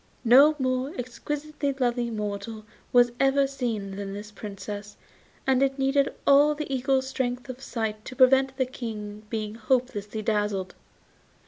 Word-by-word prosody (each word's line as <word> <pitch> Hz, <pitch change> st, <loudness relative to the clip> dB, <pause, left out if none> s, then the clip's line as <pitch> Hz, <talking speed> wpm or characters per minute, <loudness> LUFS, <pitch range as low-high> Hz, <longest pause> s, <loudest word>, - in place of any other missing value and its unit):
No 275 Hz, +6 st, +7 dB
more 255 Hz, +1 st, -1 dB
exquisitely 285 Hz, +3 st, -3 dB
lovely 245 Hz, -2 st, 0 dB
mortal 210 Hz, 0 st, -4 dB, 0.3 s
was 245 Hz, -1 st, +5 dB
ever 275 Hz, +1 st, +4 dB
seen 230 Hz, -8 st, -3 dB
than 200 Hz, -1 st, -5 dB
this 210 Hz, +1 st, -7 dB
Princess, 205 Hz, 0 st, -7 dB, 0.5 s
and 265 Hz, -1 st, +3 dB
it 270 Hz, 0 st, +2 dB
needed 275 Hz, +1 st, +2 dB
all 285 Hz, +2 st, +6 dB
an 300 Hz, -1 st, -5 dB
eagle's 265 Hz, 0 st, +1 dB
strength 250 Hz, -1 st, -3 dB
of 255 Hz, +1 st, -7 dB
sight 220 Hz, -4 st, -3 dB
to 260 Hz, -, -8 dB
prevent 265 Hz, 0 st, +4 dB
the 260 Hz, -, +2 dB
King 215 Hz, -4 st, -7 dB
being 215 Hz, -2 st, -3 dB
hopelessly 220 Hz, -3 st, -1 dB
dazzled. 205 Hz, -3 st, -1 dB
245 Hz, 140 wpm, -26 LUFS, 210-270 Hz, 0.5 s, No